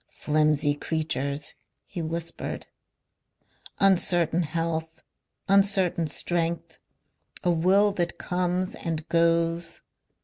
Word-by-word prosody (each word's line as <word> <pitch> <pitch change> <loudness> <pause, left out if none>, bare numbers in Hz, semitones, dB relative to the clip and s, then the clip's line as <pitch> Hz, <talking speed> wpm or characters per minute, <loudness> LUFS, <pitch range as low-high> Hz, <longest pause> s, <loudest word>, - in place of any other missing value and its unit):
"Flimsy 150 -1 +2
creatures," 145 -2 -3 0.3
he 175 - -6
whispered. 165 +1 -4 1.1
"Uncertain 175 -3 +3
health. 160 0 -3 0.4
Uncertain 195 -4 +3
strength. 165 +1 -2 0.6
A 180 - +3
will 190 +5 +4
that 175 -3 -2
comes 180 +1 -1
and 160 -1 -4
goes. 165 0 +1
165 Hz, 80 wpm, -26 LUFS, 160-180 Hz, 1.1 s, will